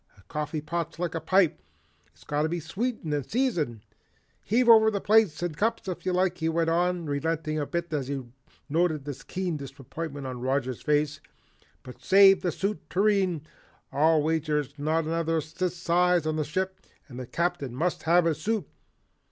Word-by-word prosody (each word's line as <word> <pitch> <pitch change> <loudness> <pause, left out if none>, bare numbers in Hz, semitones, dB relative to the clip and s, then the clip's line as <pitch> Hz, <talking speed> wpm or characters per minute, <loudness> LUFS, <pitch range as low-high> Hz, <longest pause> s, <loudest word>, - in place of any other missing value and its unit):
"A 100 - -20
coffee 150 - -4
pot's 165 +1 -4
like 175 -1 -2
a 165 - -3
pipe, 185 0 +3 0.5
it's 75 +1 -21
got 145 0 -1
to 155 - +1
be 175 +1 -2
sweetened 195 0 -3
and 145 -1 0
seasoned. 170 - -1 0.6
Heave 240 +4 +1
over 220 -1 +8
the 205 -2 -1
plates 205 -7 +3
and 175 -3 -2
cups 225 +5 -1
if 180 -1 -5
you - - +2
like," 180 0 +1
he 160 0 0
went 165 0 +1
on, 175 0 +1
relenting 155 +1 -1
a 145 - -2
bit 170 -1 -3
as 140 -4 -1
he 140 -1 -3 0.4
noted 155 -1 0
the 145 - -3
keen 180 -4 -2
disappointment 140 +1 -7
on 125 -2 -5
Roger's 130 -1 -1
face, 150 0 0 0.6
"but 125 -1 -12
save 195 0 +6
the 180 - 0
soup 200 +5 -3
tureen. 190 -5 +2 0.5
I'll 155 +1 +3
wager 155 -1 0
there's 145 0 -3
not 155 +2 0
another 165 0 0
that 160 +4 -2
size 175 0 +2
on 155 0 0
the 155 -1 -1
ship 190 +5 -2 0.3
and 125 -3 -9
the 125 - -6
Captain 170 -7 -2
must 170 +6 -1
have 170 +1 +4
his 160 -2 0
soup. 220 +1 -1
165 Hz, 185 wpm, -27 LUFS, 150-180 Hz, 0.6 s, over